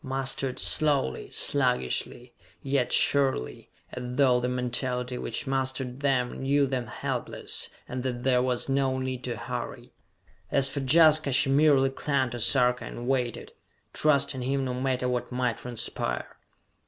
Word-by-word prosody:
Mustered 135 -1 -2
slowly, 145 - +2
sluggishly, 125 - -1 0.3
yet 135 -2 0
surely, 135 - +1 0.2
as 125 - -6
though 130 -3 +4
the 125 +1 -1
mentality 125 0 -2
which 115 - -3
mustered 130 -1 -2
them 130 -3 0
knew 140 +1 +2
them 130 -3 -3
helpless, 105 - -4 0.2
and 125 0 -4
that 125 -1 -4
there 125 -1 +3
was 125 -1 -1
no 135 -1 +1
need 130 -1 -4
to 120 -2 -3
hurry! 120 +1 -6 0.6
As 140 -1 +4
for 140 - -3
Jaska, 155 +1 +5
she 135 +1 +3
merely 140 -2 +4
clung 135 -2 -1
to 120 - -5
Sarka 125 +1 +3
and 120 +1 -7
waited 125 -3 -1 0.4
trusting 140 -3 +2
him 135 +2 -1
no 125 - -2
matter 125 0 -1
what 125 0 -2
might 125 -2 -1
transpire. 115 - -4
130 Hz, 140 wpm, -27 LUFS, 125-135 Hz, 0.6 s, Jaska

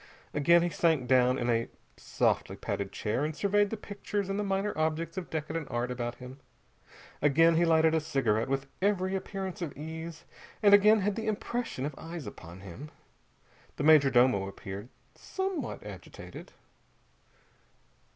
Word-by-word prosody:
Again 170 +4 +5
he 175 - +1
sank 160 -8 +1
down 125 0 +4
in 120 - -2
a 115 -1 +1 0.3
softly - - 0
padded 100 -1 -4
chair 110 +6 -2
and 155 0 -2
surveyed 205 +2 +2
the 225 - -4
pictures 205 -1 -4
and 195 +1 -1
the - - 0
minor 195 +1 -1
objects 160 +2 -1
of 185 -2 -5
decadent 155 0 -4
art 120 +1 -2
about 120 -1 -3
him. 130 +2 -11 0.8
Again 165 +4 +5
he 170 +1 +4
lighted 160 -1 +4
a 160 - +2
cigarette 130 -6 0
with 135 0 -1 0.2
every 190 -1 +1
appearance 190 -1 -4
of 160 -6 -5
ease, 160 +2 -7 0.4
and 205 -1 +7
again 210 +1 +7
had 200 +1 0
the 225 -1 -4
impression 215 - -2
of 150 - -3
eyes 165 -3 -7
upon 90 -3 -10
him. 100 - -9 0.9
The - - -3
major 150 -2 +7
domo 120 -6 +3
appeared, 100 +3 -8 0.2
somewhat 380 -3 -4
agitated. - - -10
160 Hz, 155 wpm, -30 LUFS, 130-190 Hz, 0.9 s, and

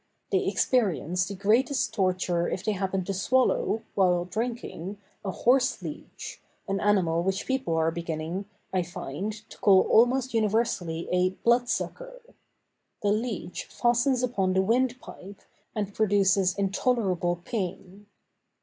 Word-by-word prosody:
They - - +1
experience 180 - +1
the 200 - -5
greatest 230 +8 +2
torture 185 -3 0
if 190 - -4
they 215 - +2
happen 190 -1 -1
to 195 - -2
swallow, 230 +1 +1
while 180 -3 +2
drinking, 215 -3 -4 0.3
a 200 - -3
horseleech, 255 +7 -1 0.3
an 195 0 -1
animal 185 -5 +2
which 190 +2 -1
people 265 -10 -1
are 160 0 +2
beginning, 170 +3 -4 0.3
I 185 - +2
find, 170 +2 -5 0.2
to - - -14
call 190 -2 +6
almost 250 +3 +3
universally 210 -7 0
a 180 0 +3 0.2
"blood 240 +1 +4
sucker." - - -4 0.8
The 205 - +3
leech 215 -4 -3
fastens 245 +2 +1
upon 195 -7 +1
the 190 0 +3
wind 250 +4 +1
pipe, 200 -3 -11 0.3
and 205 -2 -2
produces 195 -3 +3
intolerable 195 -3 +1
pain. 195 -1 -5
200 Hz, 130 wpm, -27 LUFS, 180-235 Hz, 0.8 s, call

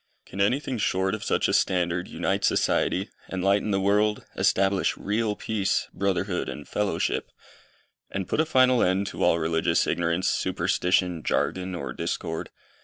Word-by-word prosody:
Can 95 - -5
anything 125 +3 0
short 95 -1 +1
of 110 - -4
such - - +1
a - - 0
standard 90 -1 +1
unite - - -2
society, - - +1 0.2
enlighten 100 +3 +1
the 100 -1 +1
world, 105 +2 +1
establish 95 0 +2
real 105 +1 -1
peace, 105 -3 -1
brotherhood 95 -1 -1
and 75 - -7
fellowship, 105 -1 -1 0.8
and 95 -2 -4
put - - -1
a 160 - +4
final 130 -3 +4
end 95 +2 +2
to - - -4
all 85 - +4
religious 80 +1 +1
ignorance, 85 +1 0
superstition, 90 -2 +1
jargon, 95 +4 -1
or 70 -7 -5
discord? 80 0 -4
95 Hz, 145 wpm, -26 LUFS, 90-105 Hz, 0.8 s, a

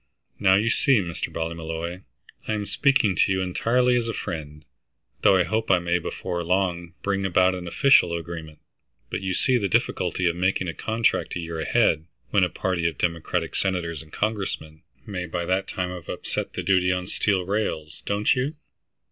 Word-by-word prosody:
Now 95 -1 +5
you 110 +4 +2
see, 135 -1 +4
Mr. 85 -3 -4
Ballymolloy, 80 +2 -4 0.5
I 110 - 0
am 105 -1 -2
speaking 135 -5 +3
to - - +3
you 95 0 +1
entirely 125 +7 +2
as 120 -1 0
a 115 - -2
friend, 75 -2 -6 0.6
though 95 - +6
I 90 - +4
hope 110 +5 -1
I 95 - +6
may 85 0 0
before 85 +1 -4
long 90 -1 -1
bring 100 -1 0
about 95 0 +3
an 90 -1 -5
official 90 - +5
agreement. 80 -2 -7 0.5
But - - -2
you 95 -1 -1
see 130 -3 +2
the 100 - 0
difficulty 90 +1 0
of 85 - +1
making 95 +1 0
a 85 - -2
contract 110 +5 0
a - - -2
year 85 -1 -5
ahead, 80 0 +2 0.3
when 100 - +4
a 90 - +2
party 85 -2 -1
of 80 -4 -3
Democratic 85 0 -1
senators 85 -5 -1
and 80 -1 -16
Congressmen 95 -7 -3 0.2
may 90 -3 -4
by 85 0 -3
that 95 +2 0
time 90 -1 -3
have 90 -4 -8
upset - - -4
the - - -3
duty 95 -1 +3
on 90 -1 -1
steel 95 0 0
rails, 90 -6 -2
don't 100 +1 +2
you?" 135 +5 -1
90 Hz, 185 wpm, -25 LUFS, 85-100 Hz, 0.6 s, though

